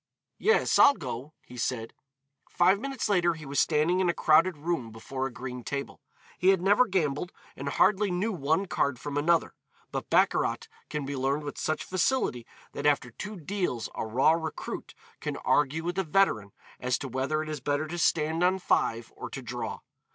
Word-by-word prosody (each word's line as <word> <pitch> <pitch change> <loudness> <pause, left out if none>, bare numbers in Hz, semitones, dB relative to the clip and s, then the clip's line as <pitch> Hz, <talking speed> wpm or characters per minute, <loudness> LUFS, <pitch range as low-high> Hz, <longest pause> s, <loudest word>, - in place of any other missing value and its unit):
"Yes, 450 +1 +3
I'll 285 0 +8
go," 140 - -6
he 125 - -12
said. 115 -1 -2 0.6
Five 185 +3 +3
minutes 270 +1 -3
later 175 -4 +2
he 155 -1 -10
was 140 +1 -1
standing 160 +4 +2
in 185 -2 +2
a 170 - 0
crowded 165 +2 +4
room 155 -6 -2
before 130 +4 -4
a - - -9
green 125 +1 -7
table. 140 +2 -5 0.4
He 180 - +1
had 195 -2 +5
never 205 +7 +4
gambled, 175 -3 -1 0.2
and - - -4
hardly 210 0 +3
knew 185 +5 0
one 160 +1 0
card 140 -7 0
from 140 +3 -6
another, 165 +3 +2 0.4
but - - -4
baccarat - - +2 0.2
can 150 -2 -3
be 140 +1 -4
learned 135 +3 0
with 145 - -6
such 155 - -1
facility 185 - 0 0.3
that - - -1
after 140 -4 +2
two 210 - -7
deals 175 - -3
a - - -3
raw 120 +7 +3
recruit 160 -1 -4 0.2
can - - -4
argue 150 +3 +1
with 175 +2 -2
a - - +2
veteran 155 - +2 0.3
as 125 0 0
to 140 - -6
whether 135 +5 -1
it 155 - -7
is 155 -1 -4
better 145 +3 -1
to 175 +2 -5
stand 160 +1 +2
on 185 +1 +3
five 115 -10 0
or - - -7
to - - -6
draw. - - -5
155 Hz, 190 wpm, -28 LUFS, 135-180 Hz, 0.6 s, I'll